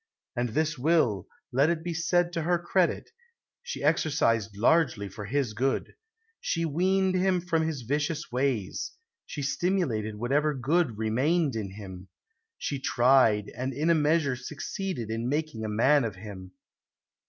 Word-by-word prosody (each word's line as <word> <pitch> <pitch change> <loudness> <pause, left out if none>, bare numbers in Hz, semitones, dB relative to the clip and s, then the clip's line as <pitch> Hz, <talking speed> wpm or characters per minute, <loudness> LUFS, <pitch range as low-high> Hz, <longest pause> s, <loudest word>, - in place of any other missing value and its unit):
And 120 0 0
this 155 +4 -1
will, 125 - +2 0.2
let 135 +5 +3
it 165 -2 -1
be 175 0 -3
said 175 +1 +1
to 165 - -1
her 175 +2 +2
credit, 175 - 0 0.5
she 480 0 -6
exercised 115 -9 +1
largely 120 -4 +2
for 105 +2 -8
his 130 0 -1
good. 130 +5 -1 0.5
She 165 0 -1
weaned 185 +4 +2
him 185 0 +2
from 170 -2 0
his 145 -6 -4
vicious 150 +6 -2
ways; 125 -6 -1 0.3
she 145 - -5
stimulated 135 - 0
whatever 140 +7 +1
good 135 -2 +1
remained 130 +7 +1
in 100 -4 -4
him; 95 -2 -9 0.5
she 140 - -3
tried, 120 -5 +3
and 130 +1 -3
in 155 +4 +2
a - - +6
measure 150 -3 +2
succeeded 130 - -5
in 115 +2 -2
making 150 -6 -2
a 110 - -2
man 130 +7 +4
of 110 -4 -3
him. 95 -2 -10
140 Hz, 150 wpm, -28 LUFS, 115-165 Hz, 0.5 s, a